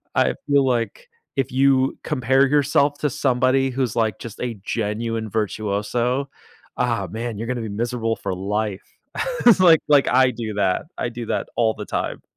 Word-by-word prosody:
I - - +2
feel 140 -1 +4
like 125 - -2 0.3
if 135 -1 -1
you 135 0 +3
compare 135 -1 +2
yourself 145 0 +2
to 150 - 0
somebody 130 +1 +2
who's, 130 -3 -2
like, 110 -4 +1
just 115 -2 -9
a 120 -2 -3
genuine 110 0 -2
virtuoso 110 +5 -1 0.5
ah 115 -6 0
man, 115 -1 -4
you're 115 +2 -5
gonna 125 -2 -2
be 110 - -5
miserable 115 +1 -2
for - - -3
life, 105 +1 -2 0.6
it's 225 - +7
like 165 -3 +7
like 145 -2 +5
I 130 0 +4
do 110 -3 -5
that, 95 +3 0
I - - -2
do 120 0 -6
that - - -2
all 110 -2 +3
the - - -7
time. - - -3
120 Hz, 170 wpm, -22 LUFS, 110-135 Hz, 0.6 s, it's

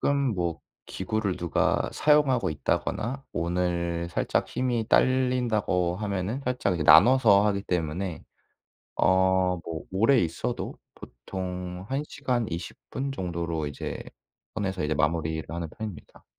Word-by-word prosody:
가끔 140 - +2 0.2
뭐 85 -3 -2 0.3
기구를 100 0 -2
누가 85 -4 +1
사용하고 145 - +3
있다거나 115 - -2
오늘 85 0 -1
살짝 - - 0
힘이 120 -3 -1
딸린다고 120 -10 +2
하면은 100 +4 -2
살짝 125 -8 0
이 - - 0
나눠서 110 - +7
하기 100 -1 0
때문에 90 0 -2 0.8
어 95 0 +3
뭐 80 -1 -5
오래 115 +8 +4
있어도 85 -4 -3 0.2
보통 90 +6 -6
1 135 +2 -1
시간 125 -4 -1
20 85 +1 -5
분 135 +1 -3
정도로 85 - -3
이제 70 - -5 0.5
선에서 95 -4 -2
이제 75 +1 0
마무리를 80 0 0
하는 85 +1 -4
편입니다. 105 -8 -8
95 Hz, 265 characters per minute, -27 LUFS, 85-115 Hz, 0.8 s, 나눠서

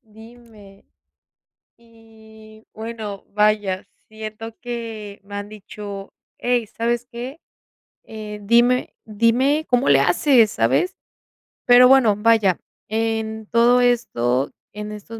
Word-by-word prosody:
Dime. 220 -3 -17 0.9
Y 220 -1 -18
bueno, 220 -3 -7
vaya, 210 -2 +1 0.2
siento 220 +1 -8
que 225 -4 -6
me 205 0 -9
han 205 0 -5
dicho: 205 -1 -9 0.2
"Ey, 245 -1 0
¿sabes 235 +2 -2
qué? 255 +6 -7 0.6
Eh, 215 -1 -8
dime 240 +3 +3
dime 240 +8 +1
cómo 245 - +2
le 140 -1 +6
haces", 220 - +4
¿sabes? 130 - +1 0.7
Pero 245 +1 +7
bueno, 250 -5 +5
vaya 210 -4 +3 0.3
en 220 0 -2
todo 240 +2 +4
esto, 140 - +1 0.2
en 210 +1 -7
estos 210 +2 -9
220 Hz, 105 wpm, -21 LUFS, 210-235 Hz, 0.9 s, Pero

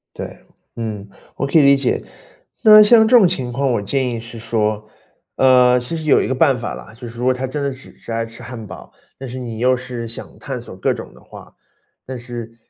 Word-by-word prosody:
对， - - -7 0.4
嗯， 105 -3 -5 0.3
我 140 - -1
可 140 - +3
以 - - +6
理 140 0 +6
解。 135 - -1 0.6
那 215 -1 +9
像 220 +1 +6
这 250 - +6
种 215 -6 +7
情 135 -9 -2
况， 135 +2 0
我 115 - 0
建 125 +5 -1
议 115 -1 -4
是 115 0 -10
说， 110 -2 -2 0.5
呃， 125 -1 +5
其 125 +7 -4
实 160 - -6
有 150 - +4
一 - - -2
个 130 - 0
办 135 0 +3
法 120 -1 -5
啦， - - -11
就 120 +1 -9
是 115 - -12
说 125 +1 +2
他 130 +1 -3
真 140 +3 -4
的 140 -1 -1
只 130 +1 -14
是 - - -9
爱 115 0 -1
吃 115 0 -13
汉 120 -3 -8
堡， - - -11 0.3
但 135 - -7
是 125 +2 -6
你 115 -3 -6
又 125 +2 +3
是 125 -2 -6
想 115 - -8
探 135 -3 -6
索 115 -5 -11
各 95 - 0
种 - - -8
的 - - -17
话， - - -14 0.5
但 130 - -7
是 120 -1 -8
125 Hz, 250 characters per minute, -19 LUFS, 115-135 Hz, 0.6 s, 那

